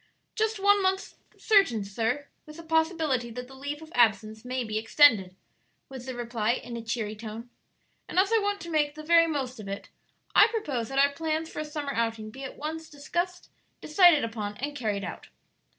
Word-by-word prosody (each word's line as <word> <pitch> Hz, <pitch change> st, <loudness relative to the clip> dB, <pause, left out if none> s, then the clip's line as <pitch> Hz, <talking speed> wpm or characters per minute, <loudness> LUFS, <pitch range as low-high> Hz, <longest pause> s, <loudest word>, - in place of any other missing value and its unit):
"Just 440 Hz, -1 st, 0 dB
one 405 Hz, +1 st, +4 dB
month 380 Hz, +1 st, 0 dB, 0.2 s
certain, 390 Hz, -, +3 dB
sir, 230 Hz, +8 st, -2 dB, 0.2 s
with 305 Hz, +1 st, -11 dB
the 335 Hz, -, -9 dB
possibility 320 Hz, -6 st, +1 dB
that 250 Hz, +2 st, -7 dB
the 265 Hz, -, -14 dB
leave 285 Hz, +3 st, -6 dB
of 320 Hz, -, -14 dB
absence 220 Hz, -2 st, +2 dB
may 250 Hz, 0 st, -2 dB
be 215 Hz, -1 st, -2 dB
extended," 220 Hz, -6 st, +4 dB, 0.5 s
was 260 Hz, -1 st, -9 dB
the 260 Hz, -, -4 dB
reply, 235 Hz, -2 st, -1 dB
in 245 Hz, -1 st, -6 dB
a 235 Hz, -, -4 dB
cheery 225 Hz, -2 st, -3 dB
tone; 225 Hz, +2 st, -8 dB, 0.6 s
"and -, -, -6 dB
as 390 Hz, +4 st, +4 dB
I 450 Hz, -, +5 dB
want 405 Hz, -1 st, -1 dB
to 340 Hz, -, -7 dB
make 295 Hz, -2 st, +1 dB
the 310 Hz, -, -8 dB
very 335 Hz, +1 st, +5 dB
most 265 Hz, -6 st, -3 dB
of 210 Hz, -, -8 dB
it, 200 Hz, +1 st, -6 dB, 0.4 s
I 420 Hz, -, +8 dB
propose 290 Hz, -, -3 dB
that 270 Hz, -, -4 dB
our 280 Hz, +1 st, +5 dB
plans 320 Hz, +2 st, -2 dB
for -, -, -6 dB
a 305 Hz, -, -3 dB
summer 295 Hz, -2 st, -4 dB
outing 225 Hz, -2 st, -2 dB
be 265 Hz, +4 st, -9 dB
at 265 Hz, -, -7 dB
once 315 Hz, +1 st, -5 dB
discussed, 345 Hz, +5 st, -4 dB, 0.3 s
decided 335 Hz, -1 st, +5 dB
upon, 215 Hz, -3 st, -4 dB
and 290 Hz, +3 st, -4 dB
carried 210 Hz, -6 st, -2 dB
out." -, -, -7 dB
275 Hz, 200 wpm, -27 LUFS, 230-320 Hz, 0.6 s, I